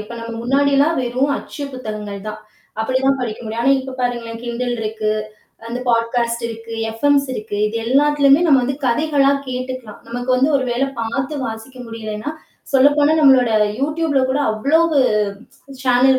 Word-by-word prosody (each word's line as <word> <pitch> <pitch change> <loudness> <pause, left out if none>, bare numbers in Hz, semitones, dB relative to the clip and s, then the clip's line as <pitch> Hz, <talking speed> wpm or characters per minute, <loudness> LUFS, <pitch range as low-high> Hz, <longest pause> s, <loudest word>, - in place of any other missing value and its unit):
இப்போ 215 +3 -8
நம்ம 230 0 -6
முன்னாடிலாம் 280 +4 +2
வெறும் 255 +3 0
அச்சு 290 - -8
புத்தகங்கள் 215 -5 -6
தான். 215 0 -6 0.4
அப்படிதான் 265 +3 +1
படிக்க 225 -4 -4
முடியும், 225 +2 -3
ஆனா 275 +2 +4
இப்போ 265 0 -7
பாருங்களேன் 235 -2 -3
kindle 245 +1 -2
இருக்கு, 215 0 -2 0.6
அந்த 240 +2 -4
பாட்காஸ்ட் 235 0 0
இருக்கு, 230 0 -8 0.2
எஃப்எம்ஸ் 280 +4 +2
இருக்கு, 215 -3 -5
இது 220 +2 -3
எல்லாத்துலயுமே 280 +3 +4
நம்ம 275 -4 +5
வந்து 265 +2 -1
கதைகளாக 280 +2 +2
கேட்டுக்கலாம். 255 -3 -5
நமக்கு 245 +2 -5
வந்து 265 +4 +3
ஒரு 265 - -2
வேளை 255 +3 0
பாத்து 270 +6 -2
வாசிக்க 225 +3 -7
முடியலைன்னா, 220 +3 -5 0.4
சொல்லப்போனால் 290 +3 +4
நம்மளோட 260 -4 +6 0.3
youtubeல 300 0 +1
கூட 275 - 0
அவ்வளோ 275 +9 +2 1.0
சேனல் 260 +1 +4
250 Hz, 145 wpm, -19 LUFS, 230-275 Hz, 1.0 s, நம்மளோட